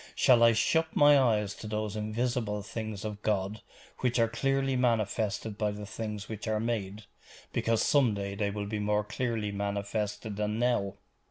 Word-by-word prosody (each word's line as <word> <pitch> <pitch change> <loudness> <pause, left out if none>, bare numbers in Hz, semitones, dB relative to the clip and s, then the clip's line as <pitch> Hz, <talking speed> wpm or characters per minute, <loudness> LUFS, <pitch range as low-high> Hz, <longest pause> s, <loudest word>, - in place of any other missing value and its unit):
Shall 120 -2 +5
I 115 0 +7
shut 160 +8 +1
my 145 0 +7
eyes 105 -6 +2
to 110 - -9
those 105 -1 -3
invisible 110 -1 -1
things 110 -1 -5
of 105 -1 -5
God 105 0 -1 0.4
which 125 -1 +1
are 115 -1 +4
clearly 135 +3 0
manifested 110 -3 0
by 105 - +1
the 105 0 -6
things 105 -1 -5
which 110 -1 -6
are 110 -1 +1
made, 110 -2 -3 0.5
because 115 -1 +1
some 130 -7 +3
day 100 0 -3
they 100 0 -1
will 100 0 -4
be 105 +1 -3
more 105 0 +1
clearly 110 -1 -2
manifested 100 +1 -3
than 105 +1 -1
now? 120 -5 +1
110 Hz, 170 wpm, -30 LUFS, 105-115 Hz, 0.5 s, I